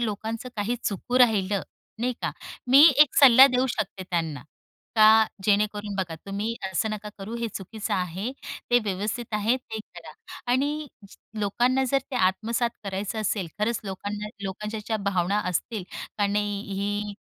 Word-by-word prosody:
लोकांचं 225 +2 -3
काही 210 +3 -1
चुकू 245 +5 -1
राहिलं 205 -5 +3 0.4
नाही 250 +2 0
का - - 0 0.4
मी 275 +3 +9 0.2
1 295 -3 +6
सल्ला 265 -1 +9
देऊ 255 -1 +1
शकते 210 -6 -3
त्यांना. 160 -6 -2 0.5
का 215 - +7 0.4
जेणेकरून 205 0 +1
बघा 180 -4 -2
"तुम्ही 205 +3 -2 0.2
असं 200 +4 0
नका 215 0 -5
करू 200 +4 -6
हे 235 0 -2
चुकीचं 205 +1 -6
आहे 185 +5 -2 0.4
ते 240 - +6
व्यवस्थित 210 +4 -3
आहे 215 +4 +2
ते 225 -4 -7
करा." 170 -7 -11 0.4
आणि 295 +4 0 0.5
लोकांना 245 +6 +1
जर 275 - +4
ते 260 - -2
आत्मसात 225 +5 +1
करायचं 200 +2 -3
असेल 200 -3 -1
खरंच 220 +2 0
लोकांना, 205 +2 -5
लोकांच्या 210 +3 -4
ज्या 220 - 0
भावना 200 -1 0
असतील 200 +3 -3 0.3
का 205 - +3
नाही, 205 0 -1
"ही 205 +1 -2
210 Hz, 150 wpm, -26 LUFS, 195-235 Hz, 0.5 s, मी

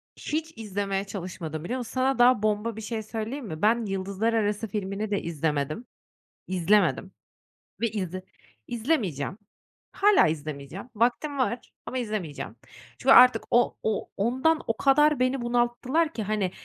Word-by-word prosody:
Hiç 315 +1 -3
izlemeye 200 -2 -2
çalışmadım, 175 -5 -6
biliyor 240 +9 -3
musun? 240 - -6
Sana 260 0 +1
daha 245 -3 +5
bomba 215 +1 0
bir 220 - -7
şey 220 0 -4
söyleyeyim 225 +5 -5
mi? 155 -1 -6
Ben 225 +2 +3
”Yıldızlar 195 +3 -1
Arası” 210 0 0
filmini 205 +1 -3
de 200 - 0
izlemedim. 155 - -2 0.6
İzlemedim 185 -1 +2 0.7
ve 230 - +3
izle 185 -3 -4 0.5
izlemeyeceğim. 220 - -1 0.5
Hâlâ 410 - +5
izlemeyeceğim. 155 - -5
Vaktim 245 +6 +1
var 245 -2 -1
ama 260 - -4
izlemeyeceğim. 195 - -4 0.4
Çünkü 270 +1 +5
artık 250 -3 +8
o 240 +1 +3
o 220 -2 -1
ondan 260 +10 +2
o 225 - -1
kadar 295 +1 +4
beni 255 0 +1
bunalttılar 245 +7 +1
ki, 220 - -3
hani, 205 -3 -1
215 Hz, 140 wpm, -26 LUFS, 190-245 Hz, 0.7 s, artık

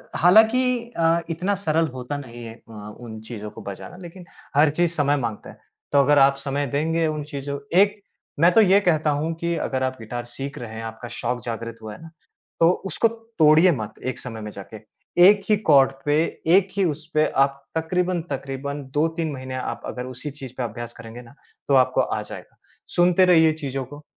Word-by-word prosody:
हालाँकि 235 - +4
अ, 165 0 +3
इतना 180 +5 -1
सरल 165 -4 +1
होता 130 +3 -5
नहीं 120 -4 -9
है 115 -1 -8
अ, 105 -3 -11
उन 115 -3 -8
चीज़ों 105 -3 -6
को - - -11
बजाना 100 - -8
लेकिन 180 0 -11 0.3
हर 150 +2 +5
चीज 170 +3 +1
समय 145 -1 +2
माँगता 115 -5 -4
है, - - -13 0.3
तो 140 - +4
अगर 145 +1 +4
आप 135 0 +5
समय 140 +1 -2
देंगे 160 +5 0
उन 150 -1 -3
चीज़ों 140 -1 -5 0.2
एक 205 +1 +3 0.4
मैं 170 +3 +6
तो 225 - +7
ये 200 -1 +5
कहता 155 -5 +2
हूँ 150 +3 -1
कि 170 0 -1
अगर 130 -5 -2
आप 130 0 -2
गिटार 120 +2 -5
सीख 135 +4 -7
रहे 115 -2 -7
हैं, 115 - -6
आपका 115 +2 -7
शौक 120 0 -3
जागृत 115 0 -5
हुआ 110 -1 -7
है - - -13
ना, 165 - -11 0.5
तो 165 - +6 0.2
उसको 195 +5 +1
तोड़िए 185 -8 +3
मत 110 -9 -4
एक 130 - -3
समय 115 -3 -7
में 105 0 -6
जाके। 100 +2 -10 0.5
एक 205 0 +5
ही 215 - +6
कॉर्ड 145 -10 +4
पे, 145 0 +2 0.3
एक 185 +3 +5
ही 195 - +3
उसपे 155 -1 0 0.2
आप 140 0 -3
तक़रीबन-तक़रीबन 155 -5 -2
2-3 160 +1 0
महीने 130 -1 -6
आप 120 -2 -4
अगर 125 - -5
उसी 130 +3 -7
चीज़ 135 -3 -10
पे 130 - -2
अभ्यास 120 +1 -6
करेंगे 115 +1 -10
ना, 120 +2 -16 0.3
तो 140 - +2
आपको 130 -1 +4
आ - - -2
जाएगा, - - -10 0.4
सुनते 180 +1 +5
रहिए 160 -3 +5
चीज़ों 135 -1 -3
को। 145 +3 -12
145 Hz, 195 wpm, -23 LUFS, 125-170 Hz, 0.5 s, तो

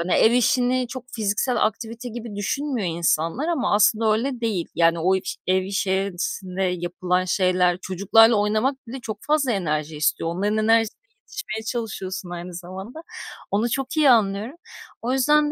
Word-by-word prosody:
ev 225 - +5
işini 250 +1 +2
çok 250 0 -8
fiziksel 220 +3 +1
aktivite 230 +3 -4
gibi 230 -2 -7
düşünmüyor 240 +1 -2
insanlar 165 - 0
ama 320 -11 0
aslında 215 +1 +3
öyle 245 +3 -2
değil, 210 -7 -1
yani 165 0 +3
o 185 +3 +3 0.3
ev 185 +1 +3
içerisinde 190 -1 -2
yapılan 180 0 -1
şeyler, 180 -1 +2
çocuklarla 210 +6 +4
oynamak 215 +6 0
bile 260 +4 -6
çok 215 -4 -6
fazla 295 -4 +2
enerji 155 -6 -2
istiyor. 155 +2 0
Onların 200 +5 -1
enerjisine 225 0 +2 0.3
yetişmeye 225 - -6
çalışıyorsun 195 -6 -4
aynı 175 +1 -7
zamanda. 190 - -8 0.5
Onu 215 +4 +1
çok 270 +5 -3
iyi 300 -3 +5
anlıyorum. 215 +2 +2 0.5
O 245 +2 -1
yüzden 295 +3 +3
215 Hz, 145 wpm, -23 LUFS, 185-245 Hz, 0.5 s, ev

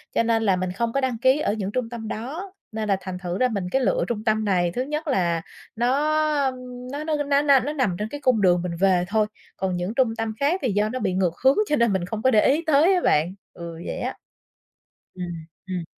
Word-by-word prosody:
Cho - - +3
nên 225 -1 +1
là 195 -3 +3
mình 185 0 -2
không 230 +5 -2
có 275 - +1
đăng 255 -3 -1
ký 260 +3 +4
ở 205 - 0
những 200 -2 -3
trung 245 0 -2
tâm 230 -2 -6
đó, 290 - -5 0.2
nên 215 -1 -3
là 195 - +3
thành 185 0 -5
thử 180 0 -3
ra 255 - +3
mình 200 -6 -3
cái 265 - +2
lựa 190 -6 +1
trung 220 -3 -3
tâm 220 -1 +1
này, 180 -4 +2
thứ 245 - -2
nhất 300 +4 -3
là 175 - +1 0.3
nó, 240 +2 +1 0.6
um, 260 -1 -3 0.3
nó 290 +2 -4
nó 310 0 0
nó 280 0 +2
n 295 - -5
nó 280 +1 +4
nằm 255 -11 0
trên 210 - -2
cái 290 +3 -7
cung 250 -6 +3
đường 180 -2 +4
mình 175 -1 -3
về 185 -2 +3
thôi, 215 +1 +1 0.3
còn 185 -1 -1
những 180 +5 -3
trung 250 -4 +1
tâm 225 -1 -3
khác 320 +7 +1
thì 250 - +1
do 205 +2 +1
nó 255 +3 -3
bị 185 - -1
ngược 180 -2 +1
hướng, 265 +1 +5
cho 300 - +3
nên 235 -6 +2
mình 180 -2 0
không 215 +3 -4
có 260 +3 +3
để 215 - +5
ý 300 +5 +3
tới 315 +5 +5
á 360 - +2
bạn. 160 - +2 0.2
Ừ, 170 -1 -7
vậy - - -4
á. - - -3 1.0
Ừm, 180 -1 -5 0.4
ừm. 180 -3 -3
220 Hz, 255 wpm, -24 LUFS, 185-265 Hz, 1.0 s, hướng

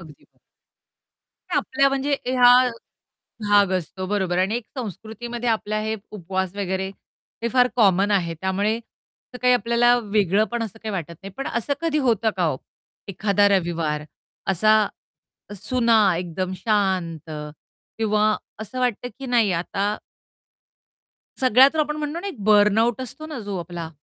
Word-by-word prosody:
अगदी 155 -4 -15
खरं. - - -37 1.1
या - - 0
आपल्या 275 +1 +2
म्हणजे 275 +1 0
ह्या 250 -1 +6 0.9
भाग 205 -2 +5
असतो 185 +1 -3
बरोबर 190 -3 0
आणि 195 +4 +1
एक 240 - -5
संस्कृतीमध्ये 235 +2 -5
आपल्याला 215 -1 -1
हे 220 0 -2
उपवास 190 -1 -3
वगैरे, 190 -1 -2 0.5
हे 235 - 0
फार 250 -1 +4
कॉमन 200 -2 +4
आहे. 175 -5 +1
त्यामुळे, 200 +4 0
असं 240 +2 -16
काही 250 0 +5
आपल्याला 240 +1 +3
वेगळं 205 -1 +2
पण 240 -1 -1
असं 220 0 -6
काही 215 -2 -4
वाटत 170 -3 -4
नाही. 195 - -8
पण 275 - -4
असं 235 +4 -2
कधी 325 -2 0
होतं 225 -1 +2
का 180 -2 +1
ओ? - - -4 0.5
एखादा 200 +1 +2
रविवार 165 -5 0 0.5
असा, 215 +3 +4 0.7
सुना 230 +2 +2 0.2
एकदम 180 +1 -3
शांत 185 -6 -1 0.7
किंवा 215 -1 +2 0.2
असं 220 +4 -6
वाटतं, 245 -1 -1
की 270 - -7
नाही 235 -6 +2
आता 200 +4 -1 1.4
सगळ्या 255 +1 +6
तर - - -3
आपण 300 0 -1
म्हणतो 305 +2 -3
ना, 400 - -6
एक 385 - -6
बर्नआउट 215 +3 +4
असतो 260 +5 -7
ना, 305 -5 -6
जो 200 -3 -4
आपला 170 -1 -6
210 Hz, 145 wpm, -23 LUFS, 190-240 Hz, 1.4 s, ह्या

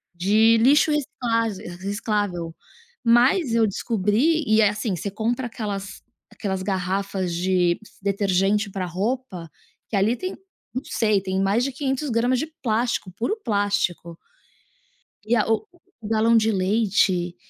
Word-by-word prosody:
de 215 +6 +4
lixo 285 +6 +4
recicla 255 -6 0 0.4
reciclável. 200 -4 -2 0.5
Mas 245 +4 +4
eu 230 - +4
descobri 230 - +1
e 220 0 +4
é, 210 - +5
assim, 210 0 -2 0.2
compra 240 +3 -1
aquelas 205 -4 -5 0.3
aquelas 190 -3 -3
garrafas 190 -1 -2
de 180 0 +1 0.2
detergente 200 +1 +1
para 190 -1 -3
roupa, 190 -1 -3 0.4
que - - -3
ali 205 +4 +2
tem, 370 +9 -5 0.4
não 255 - -3
sei, 215 -3 +1
tem 190 0 -2
mais 200 +5 +2
de 275 - -1
500 270 +2 -2
gramas 245 +3 +2
de 310 - -2 0.2
plástico, 230 -4 0
puro 380 - -1
plástico. 200 -5 -1 1.1
E 235 +3 +2
a 215 - +2 0.6
o - - -5
galão 225 +1 +3
de 225 0 +3
leite, 190 -3 +1
210 Hz, 130 wpm, -23 LUFS, 190-235 Hz, 1.1 s, é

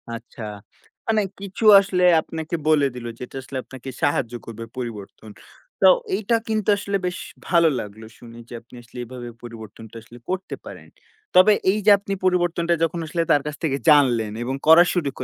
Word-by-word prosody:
আচ্ছা। 115 0 -12 0.7
মানে 220 -1 +2 0.2
কিছু 200 +3 -5
আসলে 185 -2 -1 0.2
আপনাকে 160 +1 -5
বলে 150 -2 +4
দিলো 120 -1 -6
যেটা 125 +1 -9
আসলে 130 0 -7
আপনাকে 130 0 -10
সাহায্য 125 -4 0
করবে 115 0 -8
পরিবর্তন। 110 -3 -8 0.5
তো - - +7 0.3
এইটা 220 +2 0
কিন্তু 215 -2 -1
আসলে 200 0 -2
বেশ 180 0 -3 0.3
ভালো 170 -2 +4
লাগলো 105 +2 -9
শুনে 115 -1 -13
যে - - -10
আপনি 120 +1 -18
আসলে 120 - -16
এভাবে 120 0 -9
পরিবর্তনটা 110 -1 -11
আসলে 115 +2 -15
করতে 185 +1 -3
পারেন। - - -11 0.5
তবে 185 +3 +7 0.2
এই 205 - -1
যে 210 - +7
আপনি 200 0 -5
পরিবর্তনটা 175 -2 +1
যখন 165 +1 -1
আসলে 170 +2 -2
তার 145 - +4
কাছ 150 - -4
থেকে 140 -4 0
জানলেন 125 -8 +4
এবং 130 +2 -3
করা 165 +2 +9
শুরু 170 -6 0
145 Hz, 170 wpm, -22 LUFS, 120-180 Hz, 0.7 s, করা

